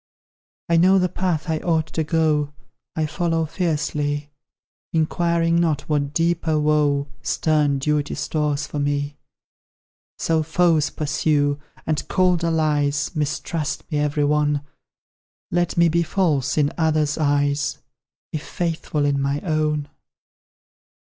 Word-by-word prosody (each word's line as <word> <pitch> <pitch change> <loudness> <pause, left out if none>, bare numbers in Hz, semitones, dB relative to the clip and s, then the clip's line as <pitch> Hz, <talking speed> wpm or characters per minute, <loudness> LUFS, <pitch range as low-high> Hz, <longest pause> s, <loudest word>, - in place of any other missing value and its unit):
I 170 - +3
know 185 +3 +5
the 180 -1 +3
path 180 -2 -1
I 160 -1 0
ought 160 -2 +1
to 160 - 0
go 150 -2 +1 0.4
I 160 - 0
follow 165 0 0
fearlessly, 150 -3 -2 0.6
Inquiring 170 +1 +2
not 155 -4 +1
what 145 -2 -1
deeper 165 -1 +1
woe 150 -2 +2 0.2
Stern 150 -1 +1
duty 150 +1 0
stores 150 -2 -1
for 150 - -5
me. 145 0 -1 1.0
So 160 -1 +1
foes 160 -1 +2
pursue, 145 -1 0 0.3
and 155 -1 -1
cold 180 -2 +2
allies 150 -3 +1
Mistrust 155 0 -2
me, 150 - +1
every 145 0 +1
one: 150 0 +2 0.9
Let 175 -1 0
me 170 0 +6
be 170 +1 +2
false 155 -6 0
in 145 -1 +2
others' 155 -2 +1
eyes, 145 -1 +1 0.6
If 155 - -2
faithful 165 -3 -2
in 140 -1 +1
my 140 +1 0
own. 155 -3 0
155 Hz, 120 wpm, -22 LUFS, 145-165 Hz, 1.0 s, me